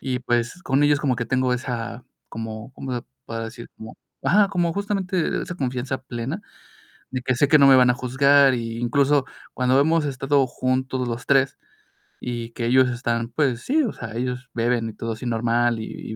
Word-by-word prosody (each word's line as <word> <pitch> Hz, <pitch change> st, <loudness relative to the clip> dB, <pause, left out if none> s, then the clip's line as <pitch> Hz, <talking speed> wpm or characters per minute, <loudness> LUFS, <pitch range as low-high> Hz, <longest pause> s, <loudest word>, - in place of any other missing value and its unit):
y 130 Hz, -2 st, -2 dB
pues, 120 Hz, +7 st, -1 dB
con 135 Hz, +2 st, +2 dB
ellos 145 Hz, 0 st, +4 dB
como 135 Hz, -4 st, +1 dB
que 120 Hz, -, -2 dB
tengo 130 Hz, +1 st, +1 dB
esa, 120 Hz, -1 st, -4 dB, 0.3 s
como, 110 Hz, +2 st, -7 dB
¿cómo 130 Hz, -2 st, -5 dB
se 120 Hz, -, -4 dB, 0.2 s
podrá 115 Hz, 0 st, -4 dB
decir? 115 Hz, +1 st, -9 dB
Como 110 Hz, 0 st, -10 dB, 0.3 s
ajá, 205 Hz, -1 st, +4 dB
como 175 Hz, -4 st, 0 dB
justamente 195 Hz, -3 st, -1 dB
esa 180 Hz, -, -6 dB
confianza 130 Hz, -3 st, -2 dB
plena, 130 Hz, -, -5 dB, 0.7 s
de 130 Hz, -1 st, -3 dB
que 130 Hz, 0 st, 0 dB
sé 140 Hz, +3 st, +2 dB
que 155 Hz, -, +6 dB
no 140 Hz, -, +7 dB
me 135 Hz, -, +8 dB
van 125 Hz, -1 st, +6 dB
a -, -, +3 dB
juzgar. 135 Hz, +2 st, +4 dB
Y 115 Hz, -1 st, -4 dB
incluso 140 Hz, +3 st, +2 dB, 0.3 s
cuando 130 Hz, +2 st, +2 dB
hemos 160 Hz, +1 st, +2 dB
estado 135 Hz, 0 st, +1 dB
juntos 130 Hz, 0 st, -1 dB
los 120 Hz, +1 st, -5 dB
3 135 Hz, -1 st, +3 dB, 0.6 s
y 120 Hz, -2 st, -4 dB
que 115 Hz, 0 st, -4 dB
ellos 130 Hz, +1 st, +4 dB
están, 120 Hz, -1 st, -2 dB
pues 130 Hz, -2 st, 0 dB
sí, 310 Hz, +4 st, +2 dB
o 240 Hz, -, -1 dB
sea, 110 Hz, -, -8 dB
ellos 125 Hz, 0 st, -3 dB
beben 115 Hz, -1 st, 0 dB
y -, -, -10 dB
todo 115 Hz, 0 st, -4 dB
así 110 Hz, +3 st, -8 dB
normal 120 Hz, 0 st, +1 dB
y 110 Hz, 0 st, -7 dB
125 Hz, 195 wpm, -23 LUFS, 120-140 Hz, 0.7 s, me